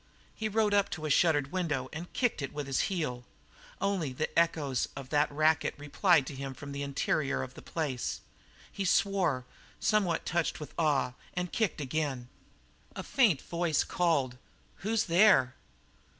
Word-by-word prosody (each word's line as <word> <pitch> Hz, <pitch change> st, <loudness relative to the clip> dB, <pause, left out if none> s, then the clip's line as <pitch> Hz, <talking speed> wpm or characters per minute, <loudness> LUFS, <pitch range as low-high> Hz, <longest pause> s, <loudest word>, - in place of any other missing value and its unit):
He 220 Hz, -1 st, -3 dB
rode 215 Hz, -1 st, +2 dB
up 200 Hz, -1 st, +3 dB
to 155 Hz, -2 st, -5 dB
a 155 Hz, -, 0 dB
shuttered 145 Hz, -2 st, +3 dB
window 150 Hz, -8 st, -1 dB
and 165 Hz, +3 st, -7 dB
kicked 245 Hz, -, 0 dB
it 135 Hz, -, -4 dB
with 145 Hz, -1 st, -4 dB
his 135 Hz, -1 st, 0 dB
heel. 150 Hz, -10 st, -2 dB, 0.6 s
Only 185 Hz, -8 st, 0 dB
the -, -, -3 dB
echoes 150 Hz, -6 st, +1 dB
of 135 Hz, -2 st, -8 dB
that 150 Hz, 0 st, +2 dB
racket 155 Hz, +2 st, +2 dB
replied 150 Hz, +1 st, +3 dB
to 140 Hz, -, -6 dB
him 135 Hz, 0 st, -5 dB
from 140 Hz, 0 st, -8 dB
the 140 Hz, 0 st, -4 dB
interior 140 Hz, 0 st, 0 dB
of 130 Hz, -, -8 dB
the -, -, -11 dB
place. 145 Hz, -7 st, -3 dB, 0.5 s
He 200 Hz, -, -3 dB
swore, 180 Hz, -9 st, +2 dB, 0.3 s
somewhat 195 Hz, -6 st, +1 dB
touched 170 Hz, -1 st, 0 dB
with 150 Hz, -, -8 dB
awe, 145 Hz, -6 st, +1 dB, 0.2 s
and 180 Hz, -1 st, -2 dB
kicked 220 Hz, -9 st, 0 dB
again. 135 Hz, -3 st, -2 dB, 0.7 s
A -, -, -5 dB
faint 220 Hz, -, +3 dB
voice 170 Hz, -2 st, 0 dB
called: 140 Hz, -8 st, 0 dB, 0.4 s
"Who's 220 Hz, +2 st, 0 dB
there?" 170 Hz, -8 st, +5 dB
155 Hz, 160 wpm, -30 LUFS, 140-180 Hz, 0.7 s, there